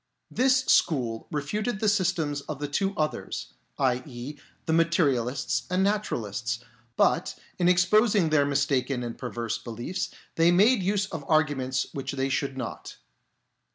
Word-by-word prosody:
This 260 +1 +3
school 120 -8 +2
refuted 200 +9 -2
the 215 - +1
systems 175 -8 +1
of 150 - -3
the 145 +1 -3
two 195 +7 -1
others, 155 0 -3 0.2
i.e. 130 +1 -2 0.3
the 160 - 0
Materialists 145 -7 +1
and 180 +1 +2
Naturalists; 115 - -1 0.4
but - - +2 0.2
in 175 0 +4
ex 180 0 +4
posing 210 -4 +3
their 150 -2 +4
mistaken 135 -2 0
and 120 -1 -5
perverse 120 -2 -4
beliefs, 120 - -4 0.3
they 165 +1 +5
made 205 +6 +5
use 195 +1 +1
of 165 -7 -6
arguments 135 -5 +1
which 135 -1 -4
they 135 0 -1
should 135 0 -1
not. 125 -3 -6
150 Hz, 140 wpm, -27 LUFS, 130-185 Hz, 0.4 s, they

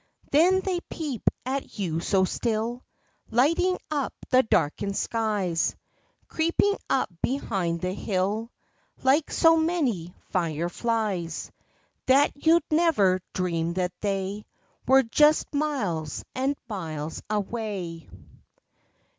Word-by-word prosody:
Then 360 +6 +5
they 375 -2 -1
peep 290 - -4 0.2
at 270 +1 -4
you 170 -5 -1
so 190 +2 +2
still, 230 +4 -2 0.5
Lighting 330 +10 +3
up 285 -3 -1 0.2
the 255 0 +7
darkened 200 - 0
skies, 205 -7 0 0.5
Creeping 335 +5 +2
up 260 -7 +1
behind 190 -11 -1
the 180 0 -1
hill 205 +4 -1 0.5
Like 280 +4 +3
so 325 0 +5
many 275 - 0 0.2
fire 170 -2 0
flies, 200 -6 -2 0.6
That 275 +3 +5 0.2
you'd 335 0 +6
never 250 - +3
dream 170 -2 -1
that 180 -1 -1
they 200 0 -2 0.4
Were 265 +1 +6
just 300 +8 +3
miles 205 - -2
and 265 +3 0
miles 160 -7 -5
away. 200 - -3
220 Hz, 105 wpm, -26 LUFS, 180-280 Hz, 0.6 s, the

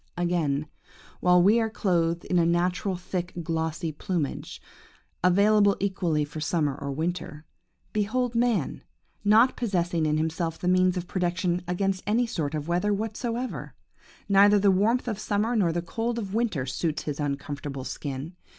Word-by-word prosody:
"Again, 165 -5 0 0.5
while 180 0 +5
we 210 +5 +5
are 225 -1 0
clothed 170 -6 0
in 180 - +2
a - - +4
natural 180 +3 +1
thick, 180 0 -4
glossy 160 0 -2
plumage, 155 -1 -3 0.6
available 200 +2 +4
equally 175 -6 0
for 155 +1 -8
summer 150 -3 0
or 140 0 -5
winter, 160 0 -4 0.5
behold 235 +4 0
man, 230 - 0 0.4
not 220 +5 +5
possessing 175 -7 0
in 150 0 +1
himself 160 +1 -1
the 180 - -4
means 185 0 +3
of 180 - -3
protection 180 -1 0
against 190 +1 0
any 230 +4 +2
sort 155 -9 -3
of 150 0 -4
weather 180 +4 +1
whatever! 230 +4 -3 0.5
Neither 200 +1 +6
the 200 0 +4
warmth 220 +7 +2
of 215 -4 -2
summer 215 +3 0
nor 190 -7 +3
the 170 +1 -2
cold 230 +6 -2
of 200 -4 -4
winter 215 - 0
suits 150 +4 -2
his 150 -1 -4
uncomfortable 140 -1 -4
skin. 140 +4 -5
180 Hz, 150 wpm, -26 LUFS, 160-205 Hz, 0.6 s, Neither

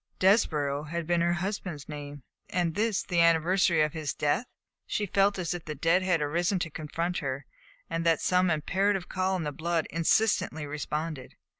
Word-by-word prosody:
Desborough 150 -8 +2
had 170 +1 -3
been 175 +1 +1
her 170 0 +2
husband's 175 -5 -4
name, 145 -2 -8 0.3
and 175 -2 0
this 215 +1 0
the 175 -2 +1
anniversary 170 0 +4
of 150 - -1
his 155 -3 -3
death; 150 +12 0 0.4
she 210 - -1
felt 200 +1 +2
as 175 -3 -2
if 175 -2 -6
the 150 - -5
dead 165 +5 +3
had 180 -4 +1
arisen 170 +6 +1
to 165 -3 -3
confront 165 +4 -3
her, 140 -2 -4 0.4
and 165 - -2
that 165 -1 +3
some 180 0 +2
imperative 190 +4 0
call 190 0 0
in 180 - -2
the 150 - -2
blood 165 +2 -1
insistently 165 -2 +1
responded. 150 -1 -4
170 Hz, 175 wpm, -28 LUFS, 150-185 Hz, 0.4 s, anniversary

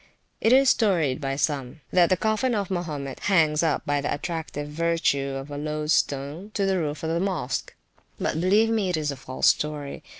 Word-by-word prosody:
It 225 - +3
is 270 +1 +6
storied 165 - +1
by 135 -1 -2
some, 140 0 -2
that 175 -2 +4
the 185 - +3
coffin 220 +5 +1
of 200 -2 -2
Mahomet 150 -7 -4
hangs 155 -6 +3
up 160 -3 0
by 145 0 0
the 145 - -2
attractive 155 -2 -4
virtue 150 -3 0
of 135 +2 -6
a 145 - -4
loadstone 150 +2 -1
to 200 - +1
the 190 -1 +1
roof 150 -1 -3
of 160 - -1
the 165 - 0
Mosque; 175 -9 -2 0.4
but 160 - -1
believe 210 +5 +3
me 215 -4 +1
it 180 - 0
is 150 -2 -1
a - - -5
false 130 0 -3
story. 150 -2 -2
155 Hz, 195 wpm, -25 LUFS, 145-185 Hz, 0.4 s, is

